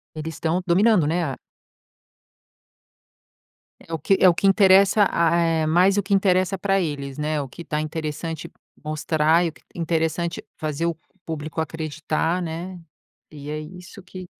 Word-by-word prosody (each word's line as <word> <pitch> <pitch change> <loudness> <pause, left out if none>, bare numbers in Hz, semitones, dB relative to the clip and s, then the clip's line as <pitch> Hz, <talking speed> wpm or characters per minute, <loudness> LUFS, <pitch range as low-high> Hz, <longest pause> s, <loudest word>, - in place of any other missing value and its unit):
Eles 155 0 -5
estão 170 +4 -1
dominando, 185 -1 +4
né, 170 +2 0
a 135 -3 -4 2.4
É 165 - -13
o 165 - -1
que 160 +6 +2
é 185 - +7
o 170 - +5
que 195 - 0
interessa 195 +1 +5
a 170 0 +2
eh, 165 -2 +1
mais 180 +5 +4
o 205 - +2
que 200 +1 0
interessa 190 0 +2
pra 195 -1 +1
eles, 140 -4 -4
né? 150 0 -1
O 140 - -5
que 170 +7 -10
tá 150 0 -2
interessante 155 +1 -5 0.3
mostrar 155 +2 +2
e - - +1
o 160 - -7
que - - -22
interessante 165 0 -1
fazer 155 +2 -2
o 170 - 0 0.3
público 160 0 -5
acreditar, 160 +2 -2
né? 175 +3 -5 0.5
E 145 -1 -9
é 155 0 -3
isso 180 +5 -11
que 185 0 -9
165 Hz, 165 wpm, -23 LUFS, 155-185 Hz, 2.4 s, é